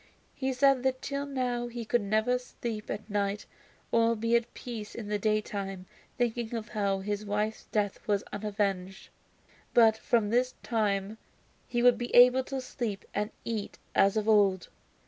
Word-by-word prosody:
He 265 0 -2
said 270 0 +4
that 260 0 -1
till 280 0 -3
now 250 -3 -1
he 240 -1 -6
could 240 +1 +2
never 220 +5 +1
sleep 235 -3 -6
at 210 - -4
night 205 -1 -1 0.5
or 230 0 +3
be 230 +2 +1
at 235 0 +1
peace 225 -4 -7
in 215 -3 -6
the 210 -1 0
daytime, 200 -3 -2 0.3
thinking 235 -1 -1
of 225 -1 -5
how 200 -3 0
his 205 +1 -3
wife's 210 +1 -2
death 205 -2 -1
was 205 -2 +1
unavenged, 200 -2 -2 0.7
but 225 -2 +7
from 220 -1 +1
this 250 +2 +1
time 210 -2 -1 0.5
he 240 -1 0
would 245 -2 +6
be 240 - -4
able 250 +1 +8
to 270 -1 -4
sleep 235 -5 -4
and 210 +1 -1 0.2
eat 220 -3 -4 0.2
as 195 +2 +4
of 215 0 0
old. 200 -4 +3
220 Hz, 165 wpm, -29 LUFS, 205-240 Hz, 0.7 s, able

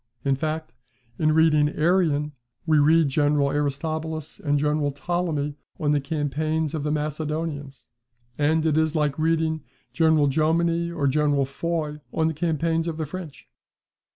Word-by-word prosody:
In 135 -1 +3
fact, 155 +3 -3 0.5
in 155 -1 +3
reading 155 -2 +4
Arrian, 155 -3 +2 0.3
we 155 -2 +4
read 160 +2 +5
General 145 0 +2
Aristobulus 155 +3 -3
and 145 -7 +1
General 150 0 +1
Ptolemy 150 -1 -2 0.3
on 145 -2 +1
the 145 -1 +2
campaigns 155 +1 -1
of 155 - -2
the 150 - -2
Macedonians; 150 -1 -3 0.5
and 155 +3 +1
it 155 -1 +3
is 160 0 0
like 150 -1 0
reading 160 0 +1 0.3
General 160 -3 +4
Jomini 165 +4 +1
or 160 -4 -2
General 145 0 +2
Foy 150 +1 -3
on 160 -1 +1
the 160 - -1
campaigns 165 +1 0
of 160 -2 -3
the 160 - -2
French. 160 -1 -8
155 Hz, 145 wpm, -24 LUFS, 145-160 Hz, 0.5 s, read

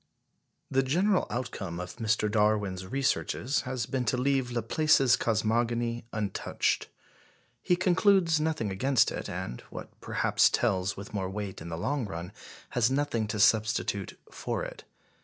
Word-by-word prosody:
The 135 - +3
general 180 +9 +2
outcome 95 -8 -4
of 90 +4 -7
Mr. 110 -2 +1
Darwin's 105 -3 +1
researches 135 +2 0
has 125 -3 -2
been 130 +1 -2
to 125 - +1
leave 135 -1 +1
Laplace's 130 +3 +3
cosmogony 115 +1 0
untouched. 105 -3 -1 0.7
He 180 - +2
concludes 180 -2 +3
nothing 155 -10 -1
against 125 +4 +2
it, - - -5
and, 90 -9 -5
what - - -8
perhaps - - +3
tells 95 +1 0
with 100 +2 -9
more 95 -3 -2
weight 100 -2 -5
in 85 - -7
the 80 - -4
long 130 - -1
run, 85 -1 -6 0.4
has 120 -1 +2
nothing 135 -5 0
to 105 0 -3
substitute 105 -2 +2
for - - -3
it. - - -8
115 Hz, 140 wpm, -29 LUFS, 100-135 Hz, 0.7 s, The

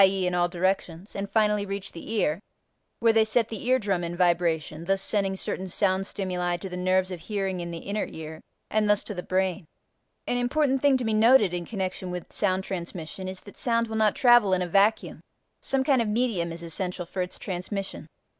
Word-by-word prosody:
e. 190 -1 +3
in 180 - 0
all 175 0 +2
directions) 185 0 -2
and 200 0 -3
finally 210 -2 +2
reach 200 0 -5
the 170 - -9
ear, 170 -7 +1 0.6
where 230 -1 +5
they 225 0 +5
set 220 +1 +2
the 225 +2 -6
ear 255 +1 +5
drum 195 -6 -1
in 170 0 -4
vibration, 170 -3 +1
thus 195 +1 +1
sending 195 -1 0
certain 190 0 -4
sound 190 +1 +1
stimuli 180 -3 -2
to 190 - -6
the 180 - -6
nerves 185 +1 +1
of 180 - -5
hearing 195 -1 -3
in 170 0 -4
the 170 - -5
inner 200 +5 -3
ear, 160 0 -8 0.3
and 215 -1 +2
thus 210 0 +3
to 210 - -5
the 180 - -4
brain. 185 +1 0 0.6
An 245 - 0
important 265 +2 +1
thing 280 -2 +4
to 250 - -3
be 220 - +1
noted 215 -3 +5
in 175 -1 -3
connection 190 -3 -3
with 180 -1 -6
sound 190 -2 +1
transmission 180 -1 -6
is 185 0 -6
that 200 - -14
sound 230 -1 +1
will 220 - -5
not 215 -2 +3
travel 240 -6 +5
in 180 - 0
a - - -3
vacuum: 200 +5 +2 0.4
some 270 -1 0
kind 265 -3 +3
of 230 - -1
a - - -1
medium 210 -8 0
is 170 +1 -7
essential 180 +1 -3
for 185 +2 -4
its 180 0 -4
transmission. 195 +1 -5
190 Hz, 215 wpm, -26 LUFS, 180-215 Hz, 0.6 s, where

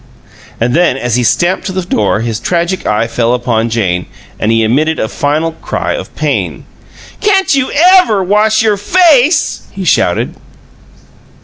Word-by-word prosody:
And 120 +2 0
then, 170 -4 +2
as 120 -3 -2
he 125 - +1
stamped 175 - 0
to - - -3
the 185 0 -3
door, 105 - 0
his 115 -1 -3
tragic 175 +7 -2
eye 105 +2 +1
fell 115 +1 0
upon 120 -2 -1
Jane, 95 -6 -1 0.3
and 110 - 0
he 115 0 +2
emitted 150 +8 +1
a - - -1
final 150 +6 -1
cry 160 - -4
of - - -7
pain: - - -2 0.5
"Can't 390 -5 +2
you 265 -1 -1
EVER 345 - +4
wash 215 +3 +2
your 215 -2 +1
face?" 315 - +2
he - - -6
shouted. - - +1
160 Hz, 155 wpm, -12 LUFS, -, 0.5 s, EVER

